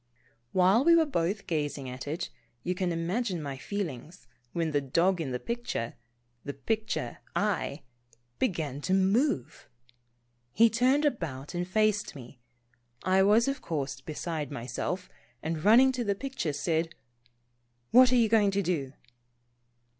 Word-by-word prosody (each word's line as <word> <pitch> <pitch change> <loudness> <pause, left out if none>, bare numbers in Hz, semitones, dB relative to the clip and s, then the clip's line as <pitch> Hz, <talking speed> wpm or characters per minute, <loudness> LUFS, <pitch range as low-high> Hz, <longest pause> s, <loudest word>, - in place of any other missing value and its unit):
While 190 +6 +4
we 335 +2 +6
were 330 -1 +5
both 195 - -1
gazing 145 -4 -2
at 130 +2 -7
it, 160 +5 -3 0.3
you 180 - 0
can 180 -1 -1
im 165 0 -2
agine 195 -2 -1
my 140 -3 -4
feelings, 165 - -5 0.3
when 165 -2 -1
the 145 -1 +1
dog 170 +7 +2
in 145 - -3
the 125 - -2
picture, 235 - -3 0.5
the 140 - -5
picture 215 - -2 0.2
I, - - -1 0.6
began 155 - -1
to 185 +5 +1
move! 195 - +1 0.8
He 230 0 +5
turned 260 +5 +3
about 155 - -2
and 175 0 -2
faced 210 -1 +1
me. 125 -1 -11 0.6
I 190 +1 +4
was 210 +6 +5
of 275 0 -2
course 135 -4 -3
beside 155 +1 -4
myself, 145 +8 -4 0.4
and 160 -1 -3
running 240 +6 +7
to 255 -2 -2
the 200 -2 0
picture 260 - -3
said: 160 +3 -1 0.5
" 120 0 -45
What 255 +1 +7
are - - +4
you 235 -2 +5
going 215 -2 +4
to 200 0 0
do 150 -7 -2
175 Hz, 150 wpm, -29 LUFS, 145-215 Hz, 0.8 s, running